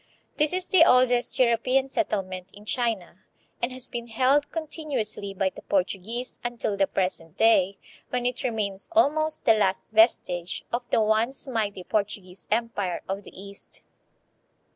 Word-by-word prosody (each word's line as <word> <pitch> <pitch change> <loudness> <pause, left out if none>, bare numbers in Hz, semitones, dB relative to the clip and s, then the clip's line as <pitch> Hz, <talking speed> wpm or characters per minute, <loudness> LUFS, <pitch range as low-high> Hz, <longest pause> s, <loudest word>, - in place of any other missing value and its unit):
This 300 -1 +4
is 365 0 +1
the 365 -4 +6
oldest 250 -4 +3
European 255 +2 +2
settlement 190 - -2
in 205 +1 -14
China 215 -7 -2 0.4
and 240 - 0
has 255 -1 -5
been 235 0 -5
held 265 +5 +2
continuously 290 -11 -3
by 190 0 0
the - - -11
Portuguese 200 +6 -2
until 240 -4 -2
the 195 -1 +2
present 180 -4 -2
day, 200 -4 +4 0.3
when 250 -1 -2
it 250 0 -1
remains 210 -6 -3
almost 310 -1 +2
the 225 - +7
last 195 -3 +1
vestige 185 -6 +2
of 240 - +1
the - - +3
once 220 +6 +1
mighty 210 -6 -2
Portuguese 200 -2 -3
empire 210 -5 -1
of 195 +1 -3
the - - -13
East. 200 0 -9
225 Hz, 145 wpm, -26 LUFS, 195-255 Hz, 0.4 s, the